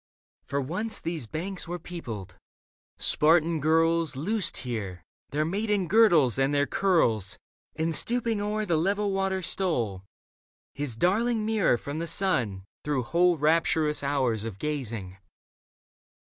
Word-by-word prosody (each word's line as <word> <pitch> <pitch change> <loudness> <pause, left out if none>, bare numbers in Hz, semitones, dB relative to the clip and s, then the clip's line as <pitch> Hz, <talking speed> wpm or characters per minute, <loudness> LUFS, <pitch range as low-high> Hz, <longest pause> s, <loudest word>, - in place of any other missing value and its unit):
For 140 - -1
once 185 +11 -3
these 165 -7 -4
banks 180 - -4
were 175 +1 -3
peopled: 140 - -7 0.6
Spartan 160 +1 +3
[girls 165 0 +2
Loosed 185 +6 -1
here 100 -8 -4 0.3
their 150 +2 0
maiden 200 +1 0
girdles 165 - +5
and 135 +1 +2
their 145 0 +3
curls, 115 - +1 0.4
And 160 +1 -1
stooping 230 +3 +1
o'er 210 +1 -1
the 170 -5 +1
level 200 +5 +1
water 195 -1 -1
stole 120 - -1 0.7
His 140 -5 -3
darling 215 - +2
mirror 215 - +2
from 145 +5 -5
the 170 - -3
sun 120 - 0 0.2
through 145 -4 0
whole 175 +6 +3
Rapturous 155 0 +2
hours 130 -6 0
of 110 -4 -6
gazing. 115 -9 -4
160 Hz, 130 wpm, -27 LUFS, 130-190 Hz, 0.7 s, girdles